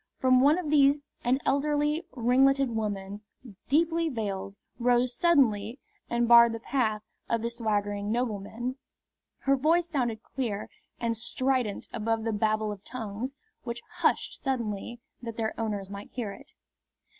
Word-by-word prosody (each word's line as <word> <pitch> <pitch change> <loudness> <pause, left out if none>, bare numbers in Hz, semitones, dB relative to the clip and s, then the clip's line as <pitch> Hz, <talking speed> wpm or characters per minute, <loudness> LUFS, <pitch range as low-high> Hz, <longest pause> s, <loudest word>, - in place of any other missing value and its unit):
From 255 -1 +4
one 290 +5 +5
of 330 -5 -3
these 285 -1 +5 0.2
an 250 +2 +3
elderly, 295 +3 +1
ringleted 265 +2 +3
woman, 205 -2 -3 0.5
deeply 330 +3 +2
veiled, 200 -6 -4 0.2
rose 245 0 +2
suddenly 245 -9 +3 0.3
and 235 0 +1
barred 235 -1 +8
the 230 - -4
path 220 -4 0 0.3
of 230 -1 0
the 235 - -1
swaggering 205 -3 -1
nobleman. 240 +2 -2 0.6
Her 275 0 +3
voice 325 +5 +2
sounded 240 -8 -1
clear 225 -6 -4 0.3
and 230 -1 0
strident 245 -1 -1
above 225 0 -1
the 225 -1 -1
babel 215 0 +1
of 200 -2 -8
tongues, 245 +2 -5 0.3
which 235 -1 -6
hushed - - +1
suddenly 235 -3 -3 0.2
that 230 -2 -6
their 220 -1 -1
owners 210 -3 -2
might 200 +1 -8
hear 230 -5 -4
it. 280 +8 -13
235 Hz, 140 wpm, -28 LUFS, 215-270 Hz, 0.6 s, barred